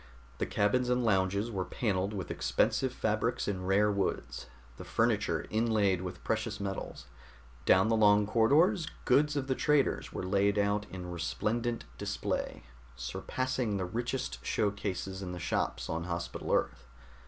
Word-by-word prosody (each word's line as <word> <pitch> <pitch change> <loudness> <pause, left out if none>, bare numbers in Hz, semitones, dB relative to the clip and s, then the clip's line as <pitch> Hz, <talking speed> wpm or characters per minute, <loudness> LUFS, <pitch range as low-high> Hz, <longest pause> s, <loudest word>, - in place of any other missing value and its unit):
The - - 0
cabins 125 +5 +1
and 125 -1 +2
lounges 100 +2 +1
were 95 -3 -1
paneled 95 0 -1
with 100 -4 -4
expensive - - +1
fabrics - - -1
and 95 -2 -2
rare 105 +2 +4
woods, 100 -1 -2 0.3
the - - -7
furniture - - +1
inlaid 110 -5 +2
with 90 -1 -7
precious 110 -1 -1
metals. 100 -8 -5 0.6
Down 95 +2 +6
the 115 - +3
long 105 -1 +5
corridors 155 - +3 0.2
goods 150 +4 +4
of 140 -2 -1
the 135 - +1
traders 145 +1 +1
were - - -4
laid 100 +2 +2
out 100 0 +1
in 90 -1 -7
resplendent 115 +8 -2
display, - - -3 0.3
surpassing 110 - -2
the 95 - -1
richest 120 +7 -3
show 105 -2 +1
cases 95 -1 -4
in 90 -2 -5
the 90 - -6
shops 70 -6 -1
on 80 +1 -3
Hospital 85 -1 -4
Earth. - - 0
100 Hz, 150 wpm, -31 LUFS, 95-115 Hz, 0.6 s, Down